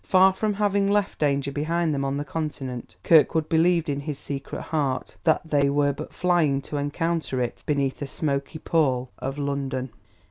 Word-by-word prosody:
Far 190 0 +5
from 210 +1 -1
having 200 -1 +2
left 205 -1 +1
danger 140 -2 +1
behind 160 +3 0
them 140 -1 -1
on 135 0 -1
the 145 - -3
Continent, 135 -5 -5
Kirkwood 160 -1 +4
believed 165 +1 +3
in 140 -1 -1
his 145 0 -4
secret 140 -1 -6
heart 145 -5 -2
that 160 - +3
they 145 -2 +3
were 145 0 +2
but 155 +3 -7
flying 170 -6 +2
to 150 - -5
encounter 145 0 -1
it 120 -1 -2
beneath 140 -3 0
the 145 - -4
smoky 140 +2 -2
pall 130 -6 +1
of 135 +2 -4
London. 135 -3 -2
145 Hz, 175 wpm, -25 LUFS, 140-165 Hz, -, Far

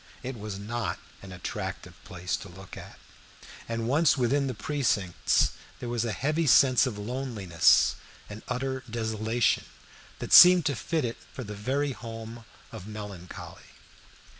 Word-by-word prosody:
It 130 0 -5
was 105 -3 -6
not 115 +4 -3 0.2
an 95 - -11
attractive 90 -1 -6
place 90 0 -3
to 100 - -10
look 95 +2 -12
at, - - -11 0.7
and 115 0 -2
once 145 +4 +3
within 135 +3 +1
the 130 - -3
precincts 105 - +1 0.3
there 120 - -5
was 120 -1 -1
a 115 - -1
heavy 155 +7 -1
sense 130 0 +5
of 110 -5 -5
loneliness 105 -7 +2 0.3
and 105 +1 -9
utter 130 +1 -3
desolation, 110 0 0 0.5
that - - -4
seemed 180 -1 +9
to 140 - +1
fit 150 +7 -1
it 115 - -4
for 130 - -7
the 105 -2 -7
very 135 +7 -1
home 115 0 -8 0.3
of 105 -3 -9
melancholy. 105 -4 -9
115 Hz, 145 wpm, -27 LUFS, 105-130 Hz, 0.7 s, seemed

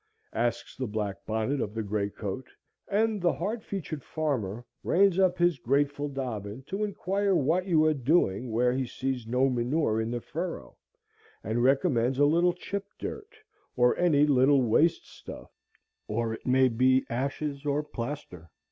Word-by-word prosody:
asks 120 0 -2
the 130 -1 -3
black 105 -2 -3
bonnet 110 +5 -1
of 105 +1 -4
the 110 - -2
gray 100 0 -1
coat; 105 +5 -6 0.4
and 215 0 +1
the 175 -1 +3
hard 220 +2 -3
featured 155 -7 -5
farmer 125 -8 -2 0.2
reins 195 0 +3
up 185 -1 +3
his 175 -5 +2
grateful 145 +3 0
dobbin 125 -4 -5
to 195 +9 -3
inquire 200 -1 0
what 170 +5 +1
you 160 -4 +4
are 155 - +4
doing 130 - +1
where 125 +2 +2
he 130 +1 0
sees 130 -2 -3
no 125 +3 +2
manure 125 -2 0
in 110 - -2
the 120 0 -2
furrow, 160 - -6 0.7
and 110 +4 -1
recommends 130 -2 +2
a 145 - +5
little 170 +4 +3
chip 200 +2 -5
dirt, 435 0 -7 0.4
or 125 0 +4
any 155 -5 +4
little 135 -1 +4
waste 150 +9 +2
stuff, - - -11 0.6
or 115 +1 -1
it 115 - -9
may 130 +1 +5
be 130 +2 +3
ashes 140 +3 -3
or 145 0 0
plaster. 115 - -7
135 Hz, 160 wpm, -28 LUFS, 115-165 Hz, 0.7 s, a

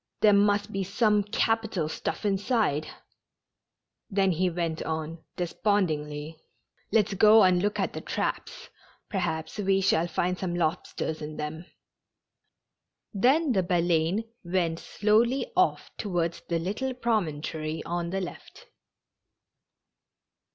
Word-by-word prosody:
There 210 -1 +6
must 205 +1 +3
be 195 -1 -1
some 210 +2 +2
capital 210 -4 0
stuff 160 - -4
inside 200 - +1
it." - - -9 1.2
Then 195 -1 +2
he 180 +2 +1
went 165 -2 -2
on 160 +1 -4
despondingly: 160 -5 -1 0.2
" - - -42
Let's 210 -3 +3
go 215 +3 +7
and 180 -1 +4
look 205 +1 -1
at - - -1
the - - -5
traps. - - -4 0.4
Perhaps 170 -2 -2
we 195 -1 +2
shall 175 -3 +2
find 180 +2 -1
some 175 -2 -2
lobsters 160 -1 -2
in 150 0 -6
them." 155 +3 -5 1.5
Then 265 +9 +3
the 195 -5 +3
Baleine 175 +2 +1 0.2
went 170 -2 0
slowly 235 - +1
off - - +1
towards 175 -5 -1
the 170 - +1
little 210 +10 -2
promontory 160 -9 -2
on 170 0 -3
the 195 +2 -2
left. 185 - -9
185 Hz, 125 wpm, -27 LUFS, 165-210 Hz, 1.5 s, go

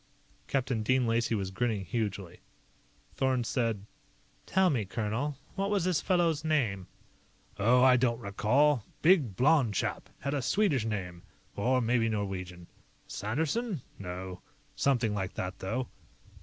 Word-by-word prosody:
Captain 130 -4 0
Dean 130 +3 +2
Lacey 115 0 +1
was 95 -2 -3
grinning 105 -1 -1
hugely. 100 -4 -3 0.7
Thorn 130 -2 +1
said: 115 -4 -1 0.6
"Tell 190 -1 +3
me, 120 -7 0
colonel 110 +8 -2 0.2
what 195 0 -1
was 205 -4 +1
this 180 -3 +1
fellow's 170 -5 +1
name?" 115 - 0 0.7
"Oh, 125 +5 +5
I 130 -1 +7
don't 120 -2 +1
recall. 120 +5 +2 0.2
Big, 155 - +4
blond 130 - +3
chap. - - -2
Had 140 +1 -2
a 145 - 0
Swedish 145 - +1
name 90 -5 -4 0.3
or 125 +5 +2
maybe 115 -1 +2
Norwegian. 95 -4 -4 0.4
Sanderson? 160 - -2 0.2
No. 90 -1 -6 0.3
Something 120 -6 +1
like 95 -3 -3
that, 95 +1 -4
though." 115 +6 -2
120 Hz, 130 wpm, -30 LUFS, 100-140 Hz, 0.7 s, I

